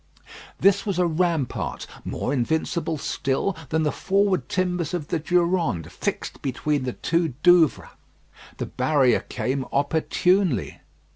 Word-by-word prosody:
This 200 Hz, 0 st, +4 dB
was 200 Hz, -4 st, -2 dB
a 180 Hz, -, +3 dB
rampart 165 Hz, -4 st, -1 dB, 0.2 s
more 130 Hz, -, -3 dB
invincible 160 Hz, +4 st, -1 dB
still 140 Hz, +7 st, -1 dB
than 160 Hz, 0 st, +1 dB
the 150 Hz, -, +1 dB
forward 195 Hz, -1 st, +1 dB
timbers 180 Hz, -3 st, -1 dB
of 155 Hz, -5 st, -5 dB
the 170 Hz, -, 0 dB
Durande 170 Hz, -, 0 dB
fixed -, -, -4 dB
between 140 Hz, +1 st, -1 dB
the 125 Hz, -, -2 dB
two 165 Hz, -5 st, -1 dB
Douvres. 175 Hz, -4 st, +4 dB, 0.7 s
The -, -, -3 dB
barrier 130 Hz, -2 st, +2 dB
came 130 Hz, +1 st, -3 dB
opportunely. 160 Hz, +3 st, +1 dB
160 Hz, 125 wpm, -24 LUFS, 140-180 Hz, 0.7 s, This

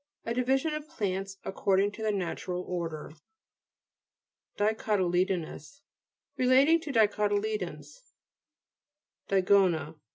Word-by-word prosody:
A 230 Hz, -, -1 dB
division 265 Hz, +5 st, +1 dB
of 305 Hz, 0 st, -6 dB
plants, 195 Hz, -, -3 dB
according 195 Hz, +1 st, +1 dB
to 220 Hz, -, -10 dB
the 215 Hz, -1 st, +1 dB
Natural 180 Hz, -1 st, -3 dB
Order. 165 Hz, -5 st, -4 dB, 1.5 s
DICOTTLE'BONOUS 190 Hz, -, -1 dB, 0.5 s
Relating 265 Hz, +6 st, +5 dB
to 310 Hz, -3 st, -5 dB
dico 210 Hz, -3 st, +3 dB
tyledons, 205 Hz, -, -3 dB, 1.3 s
DIGO'NA 185 Hz, -5 st, +3 dB
fr. 155 Hz, -, -31 dB
205 Hz, 95 wpm, -29 LUFS, 180-230 Hz, 1.5 s, Relating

